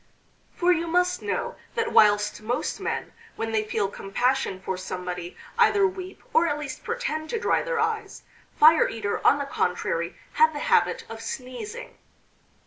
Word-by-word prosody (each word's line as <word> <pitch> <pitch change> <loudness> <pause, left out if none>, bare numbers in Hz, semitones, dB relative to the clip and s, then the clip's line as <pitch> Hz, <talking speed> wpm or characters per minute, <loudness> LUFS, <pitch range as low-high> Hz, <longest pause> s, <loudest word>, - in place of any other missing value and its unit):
For 355 +1 +3
you 335 -1 +1
must 360 +2 +1
know - - -3 0.2
that 460 -1 0
whilst 210 0 +4
most 235 +3 -2
men - - -3 0.2
when 225 0 -3
they 220 -1 +1
feel 215 -1 -1
compassion 200 +2 -1
for 190 0 -3
somebody 180 -1 -5 0.2
either 415 -4 +5
weep, 375 0 -5
or 335 +1 +4
at 290 - 0
least 295 -2 -6
pretend 425 -10 -3
to 460 - -1
dry - - +2
their - - -2
eyes, - - -2 0.4
Fire 310 +1 +7
eater, 205 -3 -3
on 280 - +6
the 285 - -3
contrary, 175 -8 -1 0.2
had 315 0 +4
the 290 - -3
habit - - +3
of - - -8
sneezing. 415 - -7
290 Hz, 160 wpm, -25 LUFS, -, 0.4 s, Fire